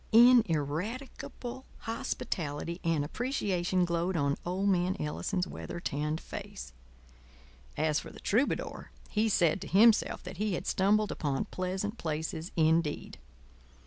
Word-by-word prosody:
Ineradicable 235 - +2 0.2
hospitality 170 - -3
and 165 -4 +1
appreciation 185 - 0
glowed 170 +1 0
on 140 -2 +2
old 185 +3 -1
man 185 +1 +2
Ellison's 180 +4 -1
weather 170 - -6
tanned 150 0 -2
face. 200 - -8 1.0
As 155 -1 +2
for - - -9
the - - -12
troubadour, 240 +8 0 0.2
he 220 +1 +2
said 175 -3 +3
to - - -6
himself 220 +3 +4
that 185 0 -8
he 210 0 0
had 180 - -4
stumbled 210 +2 +2
upon 140 -3 -1
pleasant 190 +4 -3
places 160 +2 -3
indeed. 160 -2 +1
180 Hz, 120 wpm, -31 LUFS, 160-210 Hz, 1.0 s, himself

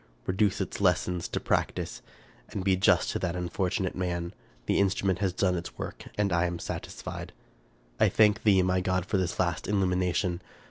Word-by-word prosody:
Reduce 100 +1 +1
its 95 - -3
lessons 90 -2 +1
to - - -2
practice, - - -1 0.5
and 100 - -4
be 95 -1 +3
just 95 +1 +3
to - - -2
that 90 -1 -2
unfortunate 90 +2 -1
man. 85 -2 -2 0.3
The - - +2
instrument 95 -2 +1
has 95 -2 +1
done 95 0 +1
its 85 0 -6
work, - - -6
and 100 -3 +1
I 85 +1 +3
am 85 0 -3
satisfied. - - -6 0.4
" - - -34
I - - +5
thank 105 0 +4
thee, 95 -3 +5
my 90 0 +2
God, 90 -1 0
for 100 - 0
this 90 -2 -1
last 85 -3 0
illumination 90 -2 +1
90 Hz, 180 wpm, -28 LUFS, 90-95 Hz, 0.5 s, I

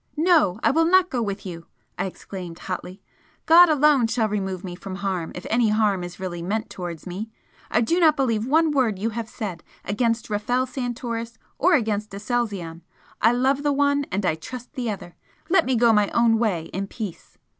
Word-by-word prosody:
"No, 310 - +3
I - - +4
will 325 +3 +3
not 365 +1 +4
go 250 -3 -1
with 200 -2 -4
you!" 170 -2 -8 0.3
I - - -2
exclaimed, 180 -2 -8
hotly 185 +1 -6 0.4
"God 345 +2 +8
alone 295 -5 +4
shall 225 -1 +1
remove 190 -3 -3
me 180 -2 -6
from 185 +2 -7
harm 190 -4 -3
if 180 - -8
any 230 -1 +2
harm 210 -4 +2
is 175 0 -8
really 175 -2 -4
meant 215 +6 -3
towards 175 -3 -6
me. 195 +5 -5 0.4
I 220 - +2
do 335 +10 +1
not 315 -3 +5
believe 230 -4 0
one 315 +3 +3
word 250 -8 +1
you 220 +4 -2
have 225 0 -5
said 190 -7 -6 0.2
against 230 +3 0
Rafel 245 +5 0
Santoris 240 -3 -4 0.2
or 355 +4 +5
against 215 -5 -1
Aselzion 200 -7 -3 0.4
I 225 - +5
love 265 +3 +1
the 290 0 +1
one, 285 0 +2
and 195 0 -1
I 170 - +2
trust 245 - -9
the 250 -5 -3
other! 190 -4 -6 0.4
let 380 - +4
me 260 - +2
go 235 -1 +5
my 210 -1 +3
own 230 -1 +4
way 200 -8 0
in 195 +2 -3
peace!" 205 -5 -8
220 Hz, 195 wpm, -24 LUFS, 190-255 Hz, 0.4 s, God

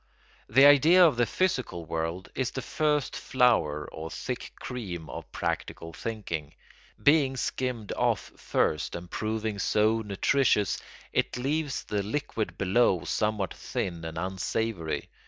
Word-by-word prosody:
The 135 +6 +7
idea 155 +6 +8
of 155 - +4
the 120 -1 +2
physical 125 - -1
world 80 +3 -3
is 130 -2 -1
the 130 - -5
first 150 +1 0
flower 115 - +2
or 80 +1 -6
thick 125 +7 -5
cream 90 -10 -5
of - - -8
practical 80 0 -3
thinking. 85 -10 -5 0.5
Being 140 -3 +4
skimmed 125 -4 -2
off - - 0
first 75 - 0
and 85 0 -8
proving 110 -1 -2
so 110 +3 +2
nutritious, 105 +1 +2 0.3
it - - 0
leaves 145 +2 -1
the 105 -1 -1
liquid 110 0 -3
below 95 -2 +3
somewhat 100 +3 -1
thin 85 -2 -4
and 80 0 -6
unsavoury. 95 -3 -2
110 Hz, 130 wpm, -28 LUFS, 90-130 Hz, 0.5 s, idea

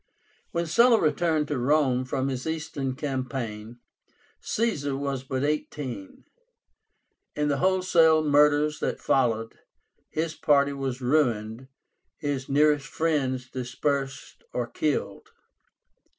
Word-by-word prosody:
When 170 0 -1
Sulla 230 +8 +5
returned 155 -1 +1
to 145 -4 -1
Rome 130 -1 +2
from 130 0 -1
his 130 +1 -3
Eastern 150 -5 -3
campaign, 130 -5 -4 0.6
Caesar 145 -12 -1
was 140 -2 -3
but 130 0 -3
eighteen. 145 -8 -4 1.1
In 150 0 0
the 140 - +1
wholesale 175 -3 +4
murders 150 0 +3
that - - -2
followed, 115 -4 0 0.5
his 160 0 -2
party 140 -2 +2
was 135 -2 -4
ruined, 125 -3 0 0.5
his 140 -2 -3
nearest 150 0 +3
friends 135 -6 -1
dispersed 135 +2 -3
or 125 - -1
killed. 150 +4 -2
140 Hz, 110 wpm, -26 LUFS, 130-155 Hz, 1.1 s, Sulla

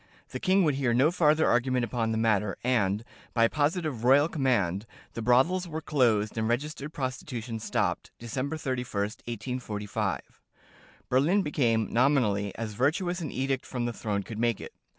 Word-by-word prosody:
The - - -5
king 190 0 +3
would 150 -4 +3
hear 130 -3 +1
no 135 +6 +4
farther 155 -2 +3
argument 125 0 +2
upon 115 -2 -1
the 110 - 0
matter; 105 -3 +1
and, 110 -4 +1 0.3
by 115 -1 +5
positive 150 -3 -1
"royal 140 +4 +5
command," 115 - 0 0.3
the 115 - -4
brothels 135 +11 +3
were 160 -1 -4
closed 115 -9 +1
and 110 - 0
registered 140 +4 -2
prostitution 125 -4 -4
stopped, - - -1
December 130 +6 -3
31, 125 -8 -2
1845. 110 -1 -4 0.7
Berlin 160 +11 +3
became 115 - +1
(nominally) 115 -6 +2
as 110 -2 -4
virtuous 170 - 0
as 170 - -4
an 145 - -5
edict 135 0 -1
from 125 -2 -3
the 120 - -2
throne 105 -3 -2
could 110 +1 -7
make 115 -2 +1
it. - - -9
125 Hz, 160 wpm, -28 LUFS, 110-145 Hz, 0.7 s, by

